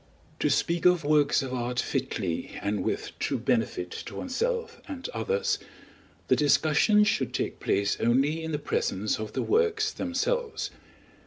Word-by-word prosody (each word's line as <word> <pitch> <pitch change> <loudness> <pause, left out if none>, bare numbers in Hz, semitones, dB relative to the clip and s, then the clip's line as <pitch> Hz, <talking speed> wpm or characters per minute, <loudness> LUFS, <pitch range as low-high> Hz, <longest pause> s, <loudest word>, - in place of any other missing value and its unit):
To - - +2
speak 170 0 +2
of 180 -2 +3
works 145 -1 +3
of 130 -1 -5
art 125 0 -2
fitly 110 - -2
and 100 -1 0
with - - -2
true - - 0
benefit 90 0 0 0.2
to - - -8
oneself 460 - -2
and 270 -3 -5
others, 475 0 0 0.7
the - - +5
discussion 155 +8 +4
should 210 - 0
take - - -2
place 100 +1 +1
only 140 +7 +2
in 160 - -3
the 150 - 0
presence 105 -8 -1
of 110 -1 -5
the - - -1
works 435 -1 +2
themselves. 460 - -2
160 Hz, 150 wpm, -28 LUFS, -, 0.7 s, the